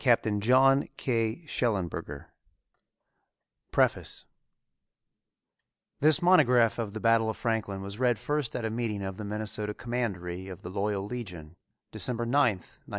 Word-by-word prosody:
CLARK 120 -4 +4
COMPANY 105 -2 -1 0.6
CLEVELAND: 115 - -1
1916 70 -1 -6 1.5
PREFACE - - +1 1.7
This 155 +4 +4
monograph 125 -11 +5
on 105 -3 -3
the 110 - -4
Battle 115 -1 +3
of 110 - -4
Franklin 110 -4 -2
was 100 +3 -7
read 125 -3 +2
first 145 -2 -2
at 120 - -2
a 110 - -2
meeting 110 -3 -2
of 95 -1 -5
the 110 - -6
Minnesota 105 0 -3
Commandery 95 -7 -3
of 95 -3 -9
the 90 - -6
Loyal 100 0 -1
Legion, 90 -9 -7 0.4
December 120 -1 0
9, 120 - -3 0.2
1902. 90 - -16
110 Hz, 135 wpm, -28 LUFS, 100-120 Hz, 1.7 s, monograph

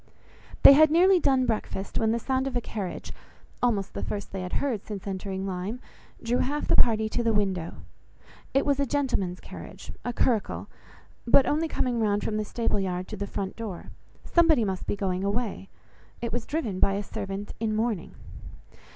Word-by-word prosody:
They - - +12
had 310 +2 +7
nearly 360 +4 +5
done 265 -4 +3
breakfast, 215 -4 -2
when 220 -1 +2
the 230 - +1
sound 260 +3 0
of 265 - -4
a - - +3
carriage, 205 -5 -5 0.5
(almost 210 -6 +1
the - - -4
first 205 - -4
they 190 - -4
had 180 0 -5
heard 245 -8 -1
since 205 -3 -7
entering 190 0 -3
Lyme) 195 +5 -3 0.4
drew 240 +2 +1
half 290 +3 -1
the - - +4
party 220 -2 +4
to 240 - -1
the 230 -2 +1
window. 190 -5 0 0.8
It 275 - +2
was 280 -1 +2
a 280 - +1
gentleman's 245 -11 0
carriage, - - -10
a 245 - -1
curricle, 235 -2 0 0.6
but 260 +3 +6
only 315 +2 +1
coming 250 -6 -1
round 205 -2 +1
from 215 - -1
the 215 - -1
stable 230 -1 -1
yard 185 -1 -2
to 215 - -5
the 200 0 -4
front 195 -1 -4
door; 215 -6 -6 0.3
somebody 325 -9 +4
must 190 -2 -3
be - - 0
going 190 -2 -1
away. 200 -1 -2 0.5
It 235 -2 -4
was 240 -1 -3
driven 240 - -2
by 195 - +3
a 200 +1 -2
servant 200 -1 -5
in 215 -1 0
mourning. 220 -5 -1
220 Hz, 185 wpm, -27 LUFS, 195-250 Hz, 0.8 s, They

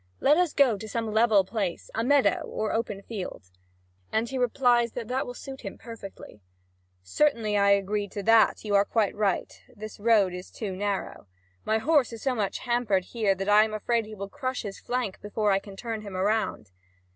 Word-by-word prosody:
Let 290 - +5
us 355 -1 +2
go 245 -8 +3
to 220 - -7
some 225 0 -2
level 220 -3 +4
place 195 -3 -4
a 225 - -1
meadow 280 +2 +3
or 215 - -2
an - - -1
open 215 -3 -2
field." 185 - -7 0.6
And 225 +2 0
he 265 - -6
replies 245 -2 +2
that 235 -3 -5
that 260 +2 -1
will 245 - -7
suit 270 +1 -9
him 195 - -7
perfectly: 215 - -11 0.6
"Certainly, 225 - +1
I 200 0 +4
agree 200 +1 +1
to 200 +1 -6
that: 225 +1 +4
you 210 - -2
are 200 0 +6
quite 210 -1 0
right, 205 -3 0 0.2
this 215 -1 -9
road 205 -4 +3
is 180 +1 -8
too 200 -4 -5
narrow. 200 - -3 0.4
My 220 - +2
horse 280 +2 +2
is 225 - -8
so 265 - +1
much 210 -5 -1
hampered 235 -6 +1
here 215 -5 +2
that 195 +1 -4
I 210 +1 +6
am 215 -1 -3
afraid 225 +1 0
he 215 - -9
will 200 -1 -6
crush 260 +1 -4
his 200 -2 -7
flank 245 -6 -3
before 210 0 0
I 195 - +3
can 195 0 -12
turn 225 +1 -5
him 200 -3 -7
around." 200 - -1
215 Hz, 205 wpm, -27 LUFS, 200-235 Hz, 0.6 s, are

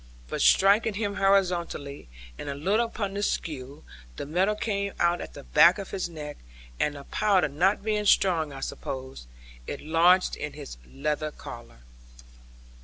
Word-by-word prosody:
But - - -3
striking 205 +2 +4
him 205 -1 -2
horizontally, 175 - 0 0.3
and 145 - -7
a 140 - -3
little 200 +11 +1
upon 200 -4 -4
the 200 - -3
skew, 145 -7 -3 0.3
the - - -5
metal 185 +8 +1
came 200 -2 -2
out 175 0 +2
at - - -9
the - - -9
back 170 - +6
of 200 -2 -7
his 185 -3 -3
neck, 150 -3 -8 0.4
and 150 -1 0
(the 140 - -9
powder 200 +2 +2
not 180 +9 +1
being 210 -1 0
strong, 165 -7 +3
I 135 -1 -8
suppose) 130 - -6 0.4
it - - -5
lodged 170 +4 +3
in - - -6
his - - -9
leather 150 +2 -2
collar. 120 - -11
175 Hz, 160 wpm, -27 LUFS, 145-200 Hz, 0.4 s, back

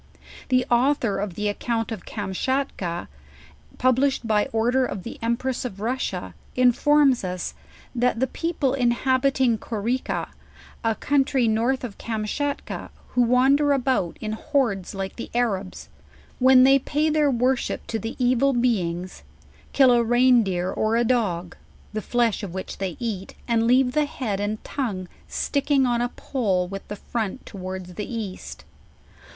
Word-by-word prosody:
The 255 -1 +3
author 240 -5 +2
of 195 -3 -3
the 210 +2 -1
ac 205 - -2
count 230 -1 -1
of 215 -5 -6
Kamschatka, 200 -3 -2 0.7
published 255 0 +2
by 210 -2 +2
order 240 +4 +1
of 200 -7 -4
the 235 - -8
empress 235 +3 -1
of 200 -6 -6
Russia: 225 - -3 0.2
informs 260 +1 +4
us, 180 -1 -3 0.4
that 245 -1 +1
the 260 - +3
people 315 -3 -1
inhabiting 260 -1 +2
Koreka, 235 +4 -2 0.5
a 225 -1 +1
country 270 -3 +2
north 235 +5 +1
of 225 -5 -7
Karnschatka, 230 +6 -3 0.2
who 250 - +1
wander 270 +4 +4
about 255 -10 0
in 215 - -4
horde 220 -4 -1
like 190 0 -5
the 235 - -6
Arabs, 200 -6 -1 0.5
when 255 0 +7
they 270 +1 +6
pay 300 +3 0
their 300 -1 +3
worship 255 0 0
to 225 - -3
the 225 +1 -5
evil 255 +2 +3
be 240 -4 +2
ings; 175 +2 -5 0.5
kill 265 -3 +5
a 240 -1 +4
rein 245 +1 +5
deer 185 -3 -1
or 220 +1 0
a 235 - +3
dog, 195 -8 0 0.4
the 215 - -2
flesh 235 -1 +1
of 190 -4 -6
which 190 - -6
they 190 -3 -3
eat, 210 -5 -4
and 230 -1 +2
leave 250 +1 +4
the 300 +3 +2
he 265 - -6
id 200 -3 -1
and 210 +1 -3
tongue 205 -10 -3 0.2
sticking 280 -1 +1
on 240 -1 +1
a 245 - 0
pole 195 -10 -1
with 195 +1 -7
the 210 - -5
front 225 +3 -4
towards 185 -2 -7
the 210 +6 -5
east. 215 -5 -6
235 Hz, 155 wpm, -24 LUFS, 205-260 Hz, 0.7 s, when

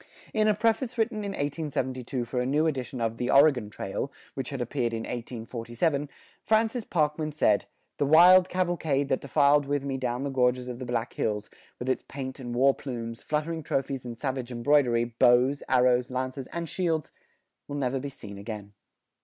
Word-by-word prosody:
In 215 -1 +3
a 210 - +4
preface 230 +3 0
written 225 -1 0
in 200 -1 -3
1872 135 -5 -2
for 125 +1 -2
a - - -1
new 150 +4 +2
edition 130 -5 -2
of 115 0 -1
"The 125 - -2
Oregon 135 -6 +5
Trail," 105 +6 -4 0.2
which 135 -2 -4
had 140 - -5
appeared 120 -1 -1
in 115 - -2
1847, 120 +5 -3 0.3
Francis 225 +2 +1
Parkman 155 -3 0
said, 105 -8 +2 0.3
"The 145 - +1
wild 180 +4 +7
cavalcade 165 -6 0
that 130 - +1
defiled 145 +1 +3
with 140 -1 -1
me 135 -1 -2
down 125 0 -2
the 140 - -2
gorges 125 -1 +1
of 125 -1 -6
the 130 - -6
Black 120 -1 -2
Hills, 105 -1 -2 0.3
with 125 - -6
its 130 - +1
paint 135 -1 -7
and 120 -2 -5
war 135 +2 +5
plumes, 115 -4 -6
fluttering 155 +2 -2
trophies 135 -2 -2
and 120 -2 -7
savage 130 -1 -3
embroidery, 120 -1 +3
bows, 125 +3 +3
arrows, 125 -1 +3
lances, 130 +1 -3
and 170 -1 -5
shields, 165 -3 -1 0.6
will 145 - -5
never 135 -1 0
be 140 +2 -5
seen 100 -7 -10
again." 105 -1 -7
135 Hz, 180 wpm, -27 LUFS, 120-150 Hz, 0.6 s, wild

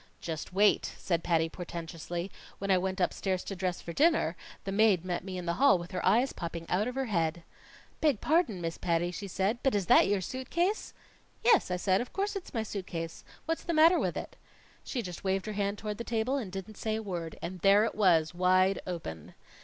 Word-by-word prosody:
"Just 160 -1 -5
wait!" 205 +3 +3
said 170 -3 -1
Patty 165 -1 +2
portentously. 170 +1 -6 0.3
"When 195 0 -1
I 190 - +5
went 190 +1 -2
upstairs 185 0 0
to 195 - -5
dress 185 -1 -2
for 170 - -6
dinner, 300 - +3 0.3
the 195 - -4
maid 200 -4 +3
met 175 -2 -2
me 185 -1 -5
in 180 - -5
the 170 - 0
hall 280 -8 +7
with 175 +1 -8
her 185 - -3
eyes 235 +8 +3
popping 170 -1 -5
out 200 +5 +1
of 250 - -4
her 270 0 -1
head. 170 -6 -1 0.6
"'Beg 290 -9 +2
pardon, 300 - +1
Miss 165 -1 -4
Patty,' 175 0 0
she 200 +3 -6
said. 195 +5 0
'But 270 -5 +2
is 200 -3 +1
that - - +6
your 200 0 +2
suit 255 +7 -6
case?' 360 +5 0 0.5
"'Yes,' 455 - +5
I 180 - 0
said, 190 +2 +2
'of 245 - -7
course 405 +1 -1
it's 390 - -6
my 225 -3 -1
suit 200 -3 -5
case. 165 -1 -5 0.2
What's 325 0 -1
the 335 - -2
matter 325 +3 +6
with - - -1
it?' - - -7 0.5
"She 245 -4 -3
just 180 -2 -7
waved 190 0 0
her 215 - -4
hand 200 0 -1
toward 210 0 -5
the - - -2
table 235 +3 0
and 230 -9 -3
didn't 195 +2 -7
say 220 -1 -1
a 220 - -3
word. 170 -5 -5
And 180 +2 -6
there 200 +4 +5
it - - -2
was, 170 -6 +3
wide 185 +2 +3
open!" 120 - -6
190 Hz, 225 wpm, -30 LUFS, 175-220 Hz, 0.6 s, hall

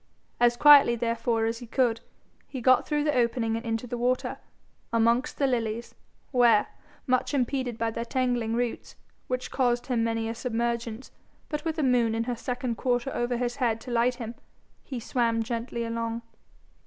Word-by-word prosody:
As 240 0 +4
quietly 285 -4 +8
therefore 230 -1 0
as 230 +1 -2
he 240 - -10
could, 235 -1 +1 0.5
he 265 - -6
got 255 +1 +4
through 295 -1 0
the 300 0 +1
opening 235 -2 +1
and 230 - -4
into 225 0 -2
the 245 0 -5
water, 250 +1 0 0.5
amongst 235 +5 +2
the 280 - +2
lilies, 235 -3 -2 0.4
where, 240 -5 +5 0.4
much 255 +2 +1
impeded 255 -2 -1
by 230 0 -1
their 230 - -3
tangling 240 -2 0
roots, 240 -1 -3 0.3
which 255 0 -3
caused 245 -2 +1
him 240 -3 0
many 225 0 -1
a 225 - -2
submergence, 235 0 -3 0.4
but 300 -1 -3
with 325 -1 -2
a 310 - 0
moon 240 -3 +2
in 225 - 0
her 245 +1 -2
second 245 0 -3
quarter 245 0 0
over 240 0 -1
his 245 0 -2
head 230 -4 +1
to 250 - -8
light 240 +1 +2
him, 230 -2 -6 0.5
he 260 -3 -5
swam 230 -1 0
gently 235 +1 -3
along. 230 0 -3
240 Hz, 175 wpm, -27 LUFS, 230-255 Hz, 0.5 s, quietly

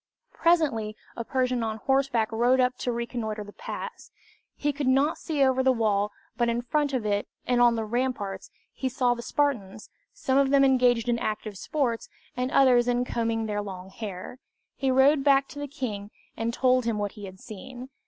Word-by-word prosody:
Presently 275 -11 +2 0.2
a 235 - -4
Persian 255 0 0
on 220 -1 -2
horseback 265 -2 +1
rode 240 +3 +3
up 250 0 +2
to 250 - -2
reconnoiter 230 -2 -3
the 205 0 -12
pass. 480 -1 -7 0.5
He 290 0 -1
could 280 -1 -2
not 275 +4 +3
see 295 -4 0
over 260 -1 +3
the 260 0 +4
wall, 210 -4 +1 0.2
but 240 -1 +1
in 235 +1 -1
front 290 +3 0
of 255 -5 -2
it 205 -1 0 0.2
and 245 -1 +2
on 240 -1 +5
the 225 -1 -2
ramparts, 215 -5 -2 0.2
he 260 - -2
saw 250 -1 +2
the 235 - -6
Spartans, 235 -7 -2 0.2
some 275 - +1
of 275 -1 +3
them 275 0 +5
engaged 245 -3 +3
in 235 -1 +1
active 215 -1 -3
sports, 240 +2 -2 0.3
and 250 +1 -1
others 250 -3 +5
in 245 0 +1
combing 230 -2 -1
their 205 -1 -2
long 190 -2 -8
hair. 205 +3 -7 0.4
He 270 - -1
rode 270 +2 +4
back 275 -1 +4
to 290 - -9
the 290 - -4
king, 225 -8 -5 0.3
and 225 +1 -1
told 255 0 +2
him 230 -2 0
what 205 -1 -2
he 205 - -9
had 190 -1 -11
seen. 250 +5 -9
245 Hz, 195 wpm, -27 LUFS, 220-265 Hz, 0.5 s, on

